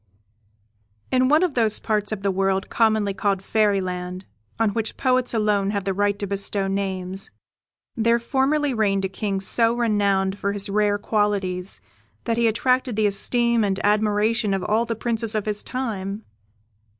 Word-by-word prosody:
In 255 0 +3
one 305 +4 +4
of 355 -5 0
those 225 -4 +1
parts 210 -1 -1
of 215 -2 -3
the 200 - +2
world, 195 0 0
commonly 220 -3 +2
called 195 -1 -1
Fairyland, 185 -3 -1 0.3
on 225 -2 +2
which 220 +1 -3
poets 255 -2 +1
alone 210 -3 +1
have 200 -1 -2
the 195 0 -1
right 205 +1 0
to 205 - -3
bestow 200 0 -1
names, 195 -1 -2 0.7
there 230 0 +3
formerly 270 +4 0
reigned 200 -4 +1
a - - -2
King 195 0 -2
so 230 +4 +2
renowned 200 -4 +1
for 200 0 -1
his 200 0 -2
rare 205 0 +2
qualities, 200 -3 -1 0.4
that 230 -1 -1
he 235 -1 +3
attracted 250 +2 +1
the 215 0 +2
esteem 235 +3 +2
and 195 -1 0
admiration 210 0 +2
of 190 - -3
all 220 +2 +1
the 230 0 -3
Princes 225 -1 -2
of 215 - -1
his 210 -1 -1
time. 215 -5 -4
210 Hz, 160 wpm, -23 LUFS, 195-230 Hz, 0.7 s, one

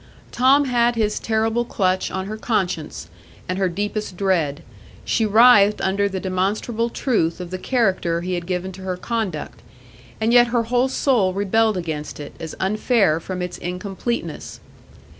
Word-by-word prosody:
Tom 270 +4 +4
had 240 -2 +2
his 215 -2 0
terrible 225 +1 0
clutch 185 -5 0
on 190 0 -4
her 215 +2 -5
conscience 190 - -2 0.4
and 185 +1 -2
her 190 -2 +2
deepest 205 +1 -4
dread; 170 -7 0 0.4
she 225 -2 +1
writhed 210 -1 +6
under 200 +1 +1
the 190 -1 -4
demonstrable 200 +5 -1
truth 210 -11 0
of 180 -1 -7
the 185 - -4
character 185 -9 0
he 180 +1 -3
had 175 -1 -3
given 185 0 -2
to 190 +1 -11
her 185 -1 -3
conduct, 185 - -4 0.6
and 225 +2 +1
yet 240 0 +7
her 235 0 +1
whole 245 +3 +1
soul 240 -9 +2
rebelled 215 +1 +2
against 155 -4 -5
it 145 - -8
as 160 - -6
unfair 200 -4 +2
from 180 +1 -5
its 180 0 -6
incompleteness. 190 +6 -4
195 Hz, 160 wpm, -21 LUFS, 180-230 Hz, 0.6 s, yet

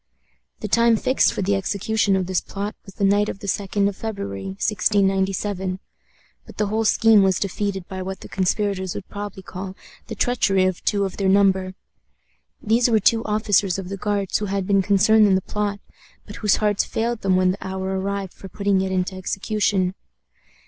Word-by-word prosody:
The 215 - -3
time 230 +2 +4
fixed 260 +4 +2
for - - -3
the 200 +2 +1
execution 200 +1 0
of 190 -1 0
this 185 0 0
plot 200 +1 -5
was 195 - -13
the - - -3
night 205 +1 +3
of - - -5
the 200 - -10
2d 200 0 0
of 200 - -3
February, 100 - -5
1697; 195 - 0 0.6
but - - -15
the 210 - +1
whole 220 +2 -1
scheme 225 -1 +5
was 190 -1 +3
defeated 195 -1 -3
by 190 -1 -6
what 190 +1 -6
the - - -9
conspirators 190 -1 -1
would 190 - -7
probably 205 -2 -7
call 185 +1 -7 0.3
the - - -6
treachery 195 -6 +2
of 185 -2 -2
two 200 -2 +1
of 190 - -6
their 195 -1 +1
number. 190 -1 +3 0.9
These 230 +3 +3
were 220 -2 +4
two 225 +3 +3
officers 210 -3 +1
of 190 -2 -6
the 195 - -4
Guards 200 -1 -1
who 210 - -2
had 195 -1 -2
been 195 0 +3
concerned 205 +3 +4
in 190 - +4
the 190 - +1
plot, 205 +1 -3 0.5
but - - -10
whose 210 -2 +2
hearts 210 -1 +1
failed 235 0 -2
them 190 -1 +2
when 185 0 +3
the 195 - -6
hour 190 0 -3
arrived 195 -1 -3
for 195 - -11
putting 200 0 0
it 190 0 -2
into 185 0 -1
execution. 190 0 -1
195 Hz, 190 wpm, -22 LUFS, 190-210 Hz, 0.9 s, scheme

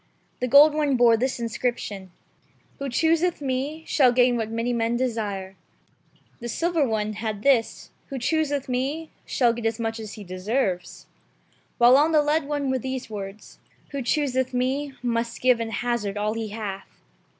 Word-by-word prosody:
The 250 - -1
gold 285 +4 +7
one 295 -3 +1
bore 235 -1 +6
this 255 +3 -1
Inscription: 230 -4 -3 0.4
— - - -36
"Who 275 0 -3
chooseth 330 +6 +2
me 280 +3 -3
shall 260 -4 +4
gain 245 0 +4
what 225 -2 -2
many 230 +2 -1
men 230 0 0
desire"; 205 -6 -3 0.8
the 240 - -6
silver 335 +4 +1
one 215 -1 -1
had 215 -1 -4
this: 260 -5 +1
— - - -39
"Who 275 - -5
chooseth 285 +1 0
me 275 +6 -2 0.2
shall 240 -3 +2
get 235 -1 -2
as 225 +1 -2
much 225 0 -2
as 215 -2 -7
he 210 - -9
deserves"; 185 +1 -2 0.7
while 245 +2 +7
on 310 +3 +3
the 300 -1 +5
lead 300 0 +1
one 285 -2 -1
were 260 - 0
these 260 -2 -5
words: 200 0 -8
— - - -34
"Who 280 -1 -3
chooseth 260 -1 0
me 270 +3 -1
must 235 -1 -1
give 250 -2 +3
and 225 -1 -3
hazard 230 -4 -2
all 210 +1 0
he 225 -1 -3
hath." 205 -2 -6
245 Hz, 175 wpm, -25 LUFS, 225-275 Hz, 0.8 s, gold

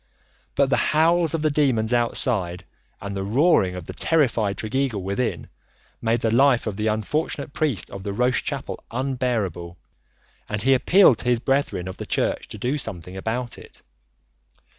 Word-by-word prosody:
But 140 -1 +2
the - - +4 0.2
howls 165 +1 +3
of 160 - -2
the 155 - +2
demons 125 -6 +1
outside, 115 -7 0 0.3
and 100 0 -6
the 95 - -2
roaring 110 - +3
of 90 -2 -7
the - - -7
terrified 115 - +1
Tregeagle 115 -2 -1
within, 100 +6 -2 0.5
made 115 +1 +1
the 110 - +1
life 125 +1 +4
of 105 -3 -3
the 105 +2 -1
unfortunate 140 +6 -2
priest 145 - -1
of 95 - -7
the 100 - -4
Roche 125 +5 +1
chapel - - -5
unbearable, 115 - -2 0.7
and 105 0 -3
he 135 +2 +5
appealed 135 - +5
to - - -6
his 120 -1 +3
brethren 135 -8 0
of 95 - -7
the - - -7
Church - - -1
to - - -9
do 130 +8 -1
something 90 - -7
about 115 +5 -4
it. - - -15
120 Hz, 165 wpm, -23 LUFS, 100-135 Hz, 0.7 s, he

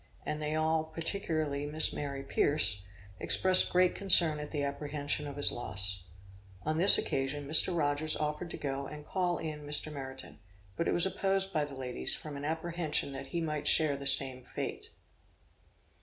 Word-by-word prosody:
and 150 0 -4
they 150 0 -3
all, 160 0 0
particularly 160 -3 -3
Miss 155 +2 +3
Mary 140 -2 -5
Pierce, 135 -7 +1 0.4
expressed 185 0 +2
great 180 0 +3
concern 170 -5 +5
at 150 0 -7
the 145 -2 -3
apprehension 145 +1 -3
of 140 - -8
his 145 - +2
loss. 95 -5 0 0.6
On 155 +1 -2
this 195 +4 +9
occasion 140 +1 -3
Mr. 160 +3 +4
Rogers 150 0 0
offered 150 +3 -4
to - - -7
go 140 -1 -5
and 150 0 -10
call 180 -1 -2
in 155 -2 -6
Mr. 150 +1 -1
Meriton, 130 -4 -9 0.4
but 170 - -2
it - - 0
was 175 - +3
opposed 195 0 -1
by 150 -1 0
the 145 -2 -11
ladies, 125 - +2
from 150 -2 -9
an 140 +1 -7
apprehension 160 -2 -2
that 135 0 -8
he 170 - -4
might 150 -2 -3
share 155 -3 +3
the 140 0 -5
same 130 -2 +3
fate. 125 - -6
150 Hz, 170 wpm, -30 LUFS, 140-160 Hz, 0.6 s, this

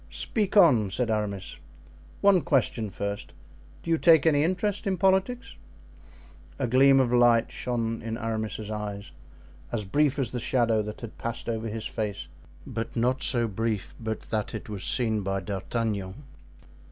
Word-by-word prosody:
"Speak 210 -2 -1
on," 125 - +6
said 115 +4 -1
Aramis. 100 -3 -3 0.6
"One 200 -3 +5
question 115 -6 +1
first. 100 +1 -5 0.5
Do 165 - -3
you 165 - +3
take 160 -3 +6
any 150 -2 +4
interest 185 +4 -1
in 190 -1 0
politics?" 190 +7 +1 1.0
A 135 - -1
gleam 135 +3 +5
of 125 -2 +2
light 120 -1 +4
shone 115 -2 -2
in 115 0 -4
Aramis's 110 -2 -3
eyes, 105 -1 -5 0.6
as 110 -3 -2
brief 145 +7 +2
as 130 -5 -1
the 125 - -3
shadow 115 -3 +2
that 105 0 -7
had 115 -3 -9
passed 115 0 -4
over 115 -1 -2
his 110 0 -4
face, 105 -3 -4 0.4
but 115 0 -5
not 125 +3 +1
so 120 -3 0
brief 110 -1 -2
but 110 -2 -4
that 110 0 -2
it 110 - -7
was 100 -2 -5
seen 110 -4 0
by 95 0 -1
D'Artagnan. 100 +1 -3
115 Hz, 155 wpm, -27 LUFS, 105-135 Hz, 1.0 s, on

